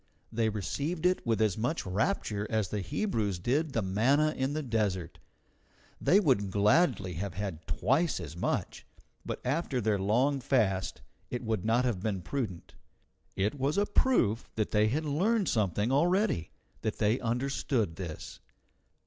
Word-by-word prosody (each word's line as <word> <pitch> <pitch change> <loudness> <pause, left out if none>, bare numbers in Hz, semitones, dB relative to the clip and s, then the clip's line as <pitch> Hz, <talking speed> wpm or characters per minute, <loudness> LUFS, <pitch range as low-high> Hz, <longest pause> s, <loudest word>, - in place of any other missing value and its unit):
They 115 -1 +1
received 140 - -3
it 185 0 +2
with 115 -1 +2
as 105 -2 0
much 125 +9 -1
rapture 105 - -1
as 110 -4 0
the 105 - -2
Hebrews 105 - -1
did 140 - 0
the 115 - 0
manna 135 +11 +2
in 130 +2 -1
the 155 0 -2
desert. 105 -8 -1 0.8
They 180 +8 +5
would 130 - +2
gladly 105 - +2
have 100 -4 -4
had 90 -6 -5
twice 135 - +1
as 80 -3 -7
much, 85 - -2 0.4
but - - -4
after 135 -1 0
their 105 -3 +1
long 125 +9 +2
fast 110 -8 0 0.3
it 125 0 -4
would 110 -4 -1
not 115 +3 +2
have 110 -7 -1
been 95 -4 -2
prudent. 105 -6 -4 0.6
It 105 +8 -1
was 140 +5 0
a 205 - +3
proof 125 - +2
that 110 -1 -1
they 105 0 +3
had 150 +8 -1
learned 195 +8 +1
something 105 +1 +1
already, 175 - +2 0.3
that 110 -1 -2
they 110 +3 +2
understood 120 - -1
this. 85 -5 -7
115 Hz, 155 wpm, -30 LUFS, 100-140 Hz, 0.8 s, They